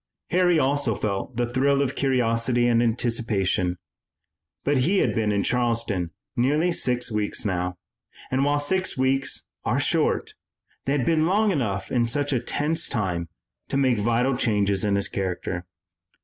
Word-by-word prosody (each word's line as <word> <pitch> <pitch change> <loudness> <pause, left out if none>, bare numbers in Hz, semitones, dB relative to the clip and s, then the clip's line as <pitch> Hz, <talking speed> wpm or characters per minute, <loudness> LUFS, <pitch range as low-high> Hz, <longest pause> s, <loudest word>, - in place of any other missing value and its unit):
Harry 180 -1 +4
also 140 -5 +1
felt 105 +3 -3
the 120 - +2
thrill 135 +3 +1
of 140 -1 0
curiosity 120 -3 +1
and 120 -1 +3
anticipation, 110 -6 0 0.9
but 140 -1 +2
he 180 +10 +2
had - - +2
been 110 -2 0
in 100 -1 +1
Charleston 115 -7 0 0.3
nearly 150 +8 +2
six 125 -6 0
weeks 105 +2 -1
now, 90 -2 -1 0.6
and 130 +1 +2
while 145 +1 +2
six 185 +4 0
weeks 130 +1 +1 0.2
are - - 0
short, - - 0 0.5
they 140 - +1
had 135 -4 0
been 160 -1 +2
long 210 +3 +3
enough 105 - -2
in 120 -2 +2
such 145 +4 -1
a 125 - +2
tense 150 +7 -1
time 90 -6 -2 0.4
to - - 0
make 130 -5 +2
vital 120 +5 +1
changes 100 -6 +1
in 100 -1 +1
his 100 - 0
character. 90 -2 -3
120 Hz, 155 wpm, -24 LUFS, 105-140 Hz, 0.9 s, Harry